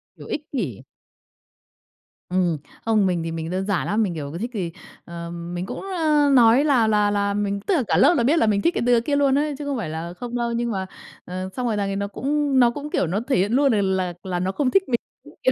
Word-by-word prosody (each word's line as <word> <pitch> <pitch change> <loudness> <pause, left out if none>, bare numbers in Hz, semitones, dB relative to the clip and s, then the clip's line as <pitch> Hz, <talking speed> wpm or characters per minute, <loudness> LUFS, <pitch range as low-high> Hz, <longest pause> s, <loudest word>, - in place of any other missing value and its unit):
Kiểu - - -12
ích 295 0 -4
kỷ. 170 - -3 1.5
Ừm, 180 -3 +1 0.3
không, 215 -3 +3
mình 175 -3 0
thì 165 - -3
mình 165 0 -4
đơn 190 +1 -2
giản 200 -4 0
lắm, 215 +2 +1
mình, 180 -4 -1
kiểu, 145 -3 -5
cứ 170 - -6
thích 235 +5 -3
thì, 180 -5 -3 0.3
ờ, 170 0 -7
mình 175 +1 -5
cũng, - - -6
ơ, 310 -6 +2
nói 245 +2 +6
là 255 -7 +3
là 210 -1 +3
là 200 0 0
mình 200 -1 -1
tức 390 - -1
là 275 - +2
cả - - +2
lớp - - +6
là 235 - +2
biết 300 +7 +3
là - - +3
mình 200 -1 +2
thích 340 - +2
cái - - -1
đứa 240 -1 +4
kia 285 +4 -1
luôn 280 -1 +3
ấy, 295 -1 0
chứ 295 - -6
không 280 -3 -2
phải 180 -9 -3
là 165 +2 -5
không 240 +6 -7
đâu, 235 -1 -1
nhưng 235 0 -1
mà, 190 -2 -2 0.4
ờ, 185 +1 -5
xong 250 -1 -2
rồi 215 -2 0
thằng 200 -1 -1
ấy 195 - -2
nó 200 0 -2
cũng 280 +5 0
nó 240 -1 +5
cũng, 290 +3 -6
kiểu, 180 - 0
nó 190 +5 -1
thể 275 - +2
hiện 200 +4 +1
luôn 275 0 +4
l - - +2 0.2
là 180 -2 -1
là 180 -2 -2
nó 185 +1 -1
không 260 +3 0
thích 390 0 +4
mình. 235 - +1 0.3
Đúng - - -15
kiểu 260 - +4
215 Hz, 270 wpm, -23 LUFS, 185-265 Hz, 1.5 s, nói